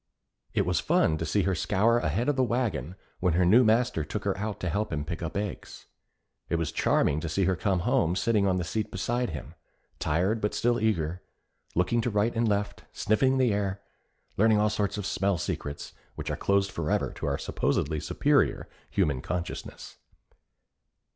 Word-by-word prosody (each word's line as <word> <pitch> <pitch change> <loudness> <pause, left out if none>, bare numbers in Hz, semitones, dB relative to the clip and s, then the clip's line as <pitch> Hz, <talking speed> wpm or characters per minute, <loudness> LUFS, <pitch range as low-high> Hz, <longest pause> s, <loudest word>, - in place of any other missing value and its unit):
It - - +2
was - - +1
fun 80 -1 +2
to 80 - -2
see 100 +5 +1
her 95 - +1
scour 105 +7 +2
ahead 95 +7 -1
of 145 - +2
the 130 - +2
wagon 115 - -1 0.2
when 90 -3 +1
her 90 +1 +3
new 110 +8 +6
master 115 -6 +2
took 105 +8 -4
her 100 -1 0
out 105 +1 -4
to 90 - -1
help 105 +4 -1
him 75 -1 -2
pick 85 0 -5
up 85 +2 -3
eggs. 100 -2 -5 0.6
It - - +1
was 85 -2 -1
charming 70 - +2
to 80 0 -4
see 95 +4 +1
her 95 +1 +2
come 95 0 0
home 85 +1 +2
sitting 105 -1 +2
on 95 -1 +2
the 90 - -1
seat 105 +5 -2
beside 120 +5 -1
him, 75 -3 -7 0.5
tired 95 +8 0
but 105 - -1
still 120 0 +2
eager, 90 -5 0 0.5
looking 90 +7 +2
to 120 - -1
right 105 +2 +1
and 115 0 +2
left, 100 -1 -1
sniffing 130 +5 +2
the 125 -5 +3
air, 100 -1 -1 0.6
learning 110 +1 +4
all 105 0 +2
sorts 105 -1 -1
of 100 - -4
smell 100 -2 0
secrets 75 -3 -5 0.2
which - - -4
are - - -1
closed 100 0 +1
forever 80 -3 -1
to - - -3
our 70 -1 0
supposedly 75 +1 -1
superior - - +1 0.2
human 75 -10 0
consciousness. 90 -1 -5
100 Hz, 185 wpm, -28 LUFS, 85-110 Hz, 0.6 s, new